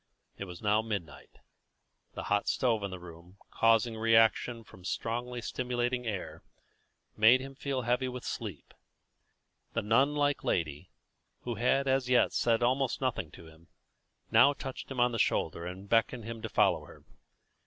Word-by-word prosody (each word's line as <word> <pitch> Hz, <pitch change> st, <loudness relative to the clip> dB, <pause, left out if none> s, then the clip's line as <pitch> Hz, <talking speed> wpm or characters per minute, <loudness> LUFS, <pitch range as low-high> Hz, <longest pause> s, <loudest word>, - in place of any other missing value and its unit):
It 100 Hz, -, -6 dB
was 90 Hz, 0 st, -10 dB
now 105 Hz, +1 st, +3 dB
midnight. 100 Hz, -10 st, -6 dB, 0.8 s
The -, -, -5 dB
hot 100 Hz, 0 st, 0 dB
stove 115 Hz, -4 st, +1 dB
in 100 Hz, -, -3 dB
the 95 Hz, -, -6 dB
room, 85 Hz, +1 st, -13 dB
causing 115 Hz, 0 st, +3 dB
reaction 115 Hz, +1 st, +3 dB
from 95 Hz, -, -16 dB
the 90 Hz, -, -8 dB
strongly 120 Hz, +1 st, -3 dB
stimulating 125 Hz, 0 st, -2 dB
air, 100 Hz, -4 st, -5 dB, 0.7 s
made 110 Hz, +4 st, +6 dB
him 135 Hz, +1 st, -7 dB
again -, -, -17 dB
feel 135 Hz, -2 st, -1 dB
heavy 125 Hz, +2 st, +1 dB
with 125 Hz, -1 st, -6 dB
sleep. 100 Hz, -10 st, -6 dB, 1.0 s
The -, -, -1 dB
nun 130 Hz, +8 st, +3 dB
like 145 Hz, -1 st, +1 dB
lady, 75 Hz, -4 st, -2 dB, 0.5 s
who 120 Hz, -, -4 dB
had 135 Hz, +4 st, +1 dB
as 130 Hz, -1 st, +1 dB
yet 125 Hz, -1 st, +4 dB
said 115 Hz, 0 st, +2 dB
almost 130 Hz, +1 st, +1 dB
nothing 125 Hz, -, -2 dB
to 85 Hz, -, -12 dB
him, 80 Hz, +1 st, -17 dB, 0.6 s
now 140 Hz, -, +6 dB
touched 130 Hz, -1 st, -7 dB
him 135 Hz, -2 st, -5 dB
on 120 Hz, 0 st, +4 dB
the 115 Hz, -, -3 dB
shoulder 85 Hz, -3 st, 0 dB
and 95 Hz, +3 st, -8 dB
beckoned 115 Hz, +2 st, +1 dB
him 115 Hz, -1 st, -6 dB
to 110 Hz, -, -5 dB
follow -, -, +2 dB
her. -, -, -15 dB
115 Hz, 165 wpm, -30 LUFS, 100-125 Hz, 1.0 s, made